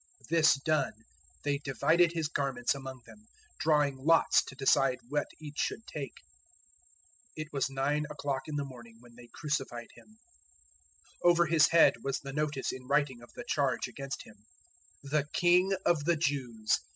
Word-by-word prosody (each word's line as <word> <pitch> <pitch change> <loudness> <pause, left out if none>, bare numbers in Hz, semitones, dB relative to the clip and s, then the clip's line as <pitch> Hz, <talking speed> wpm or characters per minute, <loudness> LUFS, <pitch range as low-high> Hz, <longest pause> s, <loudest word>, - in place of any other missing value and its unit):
This 160 -3 +5
done, 145 0 0 0.5
they 145 -1 0
divided 160 +6 +2
His 165 -3 -1
garments 135 -5 -1
among 135 -2 -8
them, 215 +1 -16 0.3
drawing 150 -4 +2
lots 165 +5 +4
to 130 - -10
decide 135 -1 +3
what 145 0 0
each 150 -2 -8
should 225 - -2
take. 140 -4 -6 1.2
015:025 155 - -3
It 155 - -24
was 135 -1 0
nine 140 +3 0
o'clock 145 -2 -3
in 155 - -4
the 145 -1 -1
morning 120 -4 -12
when 120 -1 -18
they 120 0 -14
crucified 135 -5 -4
Him. 215 +1 -19 1.1
015:026 175 - +7
Over 170 0 +4
His 160 -2 +5
head 165 0 +6
was 135 -1 -1
the 135 -1 -8
notice 150 -2 -1
in 130 -1 -9
writing 140 -3 +1
of 120 - -15
the - - -7
charge 140 -4 0
against 135 -1 -6
Him: 105 -1 -18 0.6
THE 145 +1 0
KING 180 +2 +4
OF 170 -4 +2
THE 170 0 +3
JEWS. 130 -8 0
145 Hz, 165 wpm, -31 LUFS, 130-155 Hz, 1.2 s, 015:026